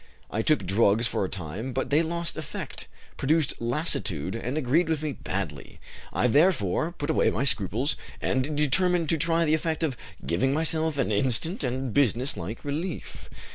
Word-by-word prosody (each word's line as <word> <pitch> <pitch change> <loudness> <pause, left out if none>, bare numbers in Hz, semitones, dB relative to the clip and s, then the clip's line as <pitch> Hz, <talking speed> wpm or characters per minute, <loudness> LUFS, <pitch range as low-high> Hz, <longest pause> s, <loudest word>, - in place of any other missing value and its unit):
I 110 - 0
took 155 +6 +2
drugs 105 +3 +3
for 115 - -1
a 95 - -2
time, 95 +9 -5
but 130 - -2
they 150 +3 +5
lost 170 +1 -2
effect, 155 -2 -7 0.3
produced 155 +1 +2
lassitude, 115 - 0
and 125 +5 -3
agreed 155 +4 +2
with 155 -2 0
me 155 - -1
badly. 90 - -5 0.3
I - - 0
therefore 150 - +3
put 150 -2 -2
away - - +3
my 120 - -1
scruples 125 - +2 0.2
and 135 +3 -1
determined 170 +3 +2
to 165 - +2
try 165 +1 +2
the 155 - +2
effect 160 0 0
of 145 -5 0 0.3
giving 115 +11 +1
myself 160 -1 +2
an 135 -5 0
instant 130 - 0
and 130 -1 -2
business 130 -1 +2
like 95 +11 -6
relief. 160 +5 -5
140 Hz, 170 wpm, -27 LUFS, 115-160 Hz, 0.3 s, they